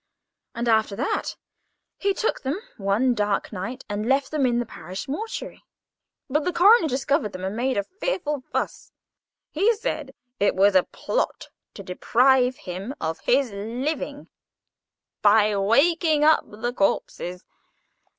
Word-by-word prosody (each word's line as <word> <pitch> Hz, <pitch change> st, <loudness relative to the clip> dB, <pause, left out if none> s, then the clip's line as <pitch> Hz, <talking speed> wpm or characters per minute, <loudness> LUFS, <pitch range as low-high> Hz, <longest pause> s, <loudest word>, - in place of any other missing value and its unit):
And, 235 Hz, +1 st, -2 dB
after 220 Hz, -3 st, +2 dB
that, 265 Hz, +7 st, -2 dB, 0.6 s
he 400 Hz, -, +1 dB
took 425 Hz, -, -1 dB
them 275 Hz, +8 st, -2 dB, 0.2 s
one 210 Hz, +5 st, +2 dB
dark 210 Hz, -1 st, -1 dB
night 230 Hz, +8 st, -5 dB
and 210 Hz, +3 st, -3 dB
left 270 Hz, 0 st, +2 dB
them 290 Hz, -4 st, +2 dB
in 240 Hz, -1 st, +1 dB
the 240 Hz, -, 0 dB
parish 185 Hz, -3 st, -8 dB
mortuary. 425 Hz, +12 st, -5 dB, 0.7 s
But 295 Hz, +3 st, 0 dB
the 360 Hz, -, 0 dB
coroner 400 Hz, +2 st, +6 dB
discovered 265 Hz, -5 st, 0 dB
them, 185 Hz, 0 st, -7 dB
and 190 Hz, +2 st, -3 dB
made 255 Hz, +1 st, 0 dB
a 200 Hz, -, +1 dB
fearful 345 Hz, -, -3 dB
fuss. -, -, -3 dB, 0.6 s
He 410 Hz, +9 st, +3 dB
said 310 Hz, -, -4 dB, 0.2 s
it 200 Hz, -, +2 dB
was 200 Hz, +2 st, +4 dB
a 185 Hz, -, +6 dB
plot -, -, -3 dB, 0.3 s
to 200 Hz, -, -8 dB
deprive 250 Hz, +7 st, +3 dB
him 190 Hz, +8 st, -6 dB
of 160 Hz, 0 st, -3 dB
his 260 Hz, -2 st, +2 dB
living 235 Hz, +10 st, -4 dB, 0.9 s
by 210 Hz, 0 st, +5 dB
waking 295 Hz, -, +3 dB
up 310 Hz, +1 st, +5 dB
the 230 Hz, +4 st, -4 dB
corpses. 180 Hz, -3 st, -1 dB
245 Hz, 140 wpm, -24 LUFS, 205-295 Hz, 0.9 s, coroner